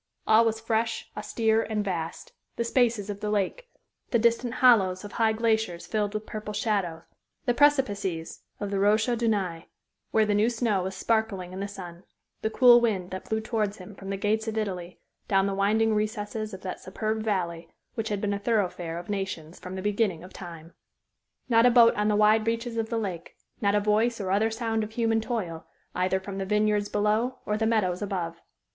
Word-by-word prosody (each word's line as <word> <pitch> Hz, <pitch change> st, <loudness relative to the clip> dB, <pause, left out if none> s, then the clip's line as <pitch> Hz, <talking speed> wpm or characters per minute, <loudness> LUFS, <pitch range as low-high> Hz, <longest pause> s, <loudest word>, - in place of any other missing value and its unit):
All 220 Hz, +1 st, +6 dB
was 225 Hz, -1 st, 0 dB
fresh, 225 Hz, 0 st, -1 dB
austere, 220 Hz, +1 st, +1 dB
and 215 Hz, -2 st, -2 dB
vast 170 Hz, -4 st, -4 dB, 0.2 s
the 235 Hz, -, -1 dB
spaces 235 Hz, -4 st, +1 dB
of 200 Hz, -, -7 dB
the 210 Hz, -, -3 dB
lake, 210 Hz, -, -1 dB, 0.4 s
the 235 Hz, -, +3 dB
distant 235 Hz, +1 st, +1 dB
hollows 195 Hz, -7 st, +4 dB
of 205 Hz, -, -8 dB
high 225 Hz, -1 st, +2 dB
glaciers 220 Hz, -6 st, 0 dB
filled 210 Hz, -1 st, -1 dB
with 215 Hz, 0 st, -3 dB
purple 210 Hz, -1 st, -6 dB
shadow, 200 Hz, -7 st, -1 dB, 0.4 s
the 245 Hz, -, +3 dB
precipices 205 Hz, -, +1 dB, 0.2 s
of 205 Hz, -1 st, -4 dB
the 200 Hz, -, 0 dB
Rochers 220 Hz, +4 st, +2 dB
de 235 Hz, -, +1 dB
Naye, 185 Hz, -6 st, -1 dB, 0.4 s
where 220 Hz, -1 st, +3 dB
the 210 Hz, -, +1 dB
new 210 Hz, +3 st, +3 dB
snow 225 Hz, -5 st, 0 dB
was 190 Hz, +1 st, -4 dB
sparkling 210 Hz, -6 st, -1 dB
in 190 Hz, -, -6 dB
the 200 Hz, -, -2 dB
sun, 180 Hz, -4 st, -9 dB, 0.4 s
the 220 Hz, -, 0 dB
cool 240 Hz, +1 st, +7 dB
wind 195 Hz, -6 st, 0 dB
that 185 Hz, 0 st, -7 dB
blew 220 Hz, 0 st, +1 dB
towards 215 Hz, -2 st, -1 dB
him 185 Hz, +2 st, -11 dB
from 195 Hz, 0 st, -9 dB
the 195 Hz, -, -2 dB
gates 215 Hz, +2 st, 0 dB
of 220 Hz, 0 st, -3 dB
Italy, 180 Hz, -4 st, -3 dB, 0.3 s
down 195 Hz, -2 st, +3 dB
the 200 Hz, -, -1 dB
winding 215 Hz, +3 st, +2 dB
recesses 215 Hz, 0 st, -2 dB
of 190 Hz, -1 st, -8 dB
that 185 Hz, -, -5 dB
superb 215 Hz, +3 st, -3 dB
valley 170 Hz, -6 st, -2 dB, 0.2 s
which 225 Hz, 0 st, -3 dB
has 205 Hz, -, 0 dB
been 205 Hz, 0 st, -1 dB
a 200 Hz, -, -2 dB
thoroughfare 185 Hz, -6 st, -1 dB
of 175 Hz, -, -7 dB
nations 190 Hz, -5 st, -4 dB
from 185 Hz, +1 st, -7 dB
the 190 Hz, -, -5 dB
beginning 205 Hz, -5 st, 0 dB
of 185 Hz, -, -12 dB
time. 165 Hz, -2 st, -10 dB, 0.7 s
Not 230 Hz, -1 st, +5 dB
a -, -, +7 dB
boat 235 Hz, -1 st, +7 dB
on 210 Hz, 0 st, 0 dB
the 210 Hz, -, +2 dB
wide 215 Hz, +1 st, +4 dB
reaches 230 Hz, +1 st, -1 dB
of 225 Hz, -1 st, -2 dB
the 230 Hz, -, -1 dB
lake; 185 Hz, -6 st, -4 dB, 0.3 s
not 200 Hz, -1 st, +2 dB
a -, -, +4 dB
voice 215 Hz, +3 st, +1 dB
or 190 Hz, -2 st, -2 dB
other 210 Hz, +3 st, +3 dB
sound 225 Hz, -1 st, -1 dB
of 215 Hz, +1 st, -7 dB
human 225 Hz, -1 st, +1 dB
toil, 195 Hz, -9 st, -4 dB, 0.3 s
either 185 Hz, +1 st, +1 dB
from 195 Hz, 0 st, -6 dB
the 195 Hz, -, -2 dB
vineyards 210 Hz, 0 st, +1 dB
below 215 Hz, +5 st, +1 dB
or 210 Hz, -, 0 dB
the 220 Hz, +1 st, +1 dB
meadows 195 Hz, -5 st, +1 dB
above. 175 Hz, -4 st, -3 dB
210 Hz, 200 wpm, -27 LUFS, 190-225 Hz, 0.7 s, cool